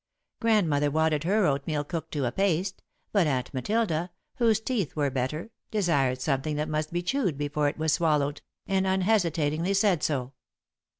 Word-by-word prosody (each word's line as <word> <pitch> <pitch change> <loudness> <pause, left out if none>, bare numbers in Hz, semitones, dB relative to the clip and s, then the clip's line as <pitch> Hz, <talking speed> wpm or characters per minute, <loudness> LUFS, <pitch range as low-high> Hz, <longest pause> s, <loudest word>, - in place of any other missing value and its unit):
Grandmother 175 - +2
wanted 155 0 +1
her 205 +2 +3
oatmeal 145 0 0
cooked 165 +2 -5
to 145 -4 0
a 120 - 0
paste, 190 +1 0 0.3
but 195 -6 +3
Aunt 130 -2 -1
Matilda, 175 - 0 0.3
whose 225 -4 +3
teeth 220 - -2
were 145 -3 0
better, 135 - -3 0.2
desired 145 -11 +1
something 135 +2 -1
that 150 +1 -1
must 155 0 -2
be 175 +1 -2
chewed 190 - 0
before 145 0 0
it 145 - -8
was 160 -1 +1
swallowed, 150 -4 +1 0.2
and 190 0 +1
unhesitatingly 180 -3 +1
said 195 -5 +3
so. 135 -4 -1
160 Hz, 160 wpm, -27 LUFS, 145-190 Hz, 0.3 s, her